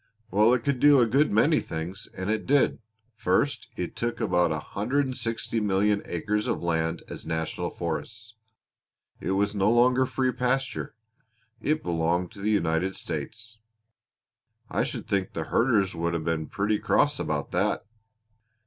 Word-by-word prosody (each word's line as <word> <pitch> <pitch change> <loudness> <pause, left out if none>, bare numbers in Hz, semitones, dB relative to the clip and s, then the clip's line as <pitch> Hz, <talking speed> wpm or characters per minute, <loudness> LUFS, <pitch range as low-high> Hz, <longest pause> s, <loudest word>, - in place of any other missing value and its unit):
"Well, 105 +3 +5
it 120 - -3
could 140 -2 0
do 145 0 +7
a 120 - +5
good 135 +7 +2
many 145 +9 +4
things, 85 +5 -6
and 95 0 -3
it 110 - -2
did. 140 -3 +3 0.4
First, 115 +6 0
it 90 - -4
took 120 0 -2
about 90 -1 +2
160,000,000 105 - 0
acres 105 +5 -1
of - - -1
land 80 0 0
as - - -7
National 80 0 -2
Forests. 110 0 -5 0.9
It 95 - -1
was 100 +1 +1
no 100 0 +2
longer 125 +2 +4
free 130 0 0
pasture. 125 -1 -1 0.7
It 155 +5 0
belonged 85 +1 0
to 100 -3 -11
the 105 - 0
United 90 -2 +1
States." 110 0 -6 1.1
"I - - +1
should - - -5
think 100 -2 -1
the 80 - -2
herders 110 -6 +3
would 85 0 -1
have 80 -2 -3
been 80 -2 -1
pretty 105 +1 0
cross - - +2
about - - -2
that!" 100 +4 0
105 Hz, 150 wpm, -27 LUFS, 90-120 Hz, 1.1 s, do